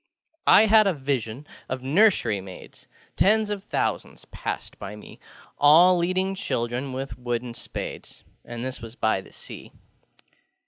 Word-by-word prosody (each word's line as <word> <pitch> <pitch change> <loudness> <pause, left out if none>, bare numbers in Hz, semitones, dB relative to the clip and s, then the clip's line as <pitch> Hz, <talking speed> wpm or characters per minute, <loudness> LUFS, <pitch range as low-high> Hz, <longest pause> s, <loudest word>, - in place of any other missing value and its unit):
I 220 - +7
had 215 -1 +5
a 190 - +1
vision 135 -2 -3 0.2
of 130 0 -4
nursery 135 - +3
maids; 95 -1 -13 0.3
Tens 215 +1 +3
of 200 -2 -4
thousands - - -3
passed - - -6
by 105 - -7
meŌĆö 105 - -13 0.4
All 165 +5 +7
leading 185 +2 0
children 125 -6 -3
with 130 -1 -6
wooden 120 -1 -3
spades, - - -8 0.2
And 120 +1 -6
this 130 0 -5
was 115 0 -10
by 110 -5 0
the - - -17
Sea. - - -11
130 Hz, 140 wpm, -25 LUFS, 120-185 Hz, 0.4 s, I